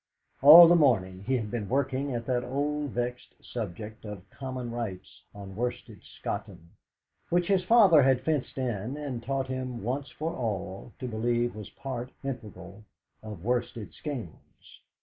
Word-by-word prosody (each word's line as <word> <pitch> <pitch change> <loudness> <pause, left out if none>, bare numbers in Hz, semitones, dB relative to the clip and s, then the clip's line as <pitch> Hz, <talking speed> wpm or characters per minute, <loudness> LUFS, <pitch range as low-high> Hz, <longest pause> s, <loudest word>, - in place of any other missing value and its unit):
All 160 +5 +12
the 175 - +6
morning 100 - +2
he 130 0 +2
had 110 -3 -4
been 110 -5 -3
working 135 +1 0
at 115 -1 -4
that 125 0 0
old 145 +2 -2
vexed 125 0 -4
subject 110 -1 -7
of 105 -3 -8
Common 130 -3 -5
Rights 105 -8 -6
on 100 -2 -9
Worsted 120 +2 -4
Scotton, 85 +1 -7 0.6
which 175 0 +2
his 190 0 +2
father 195 -7 +7
had 130 -1 +3
fenced 150 -2 -2
in 125 0 -2
and 140 -5 -4
taught 135 +2 -2
him 130 -4 -5
once 130 +4 -2
for 160 +5 -4
all 105 -3 -4
to 130 - -5
believe 120 +1 0
was 105 -2 -8
part 130 -2 -6
integral 105 -7 -7 0.4
of 105 -5 -9
Worsted 120 -2 -2
Skeynes. 125 - -9
125 Hz, 150 wpm, -28 LUFS, 110-135 Hz, 0.6 s, All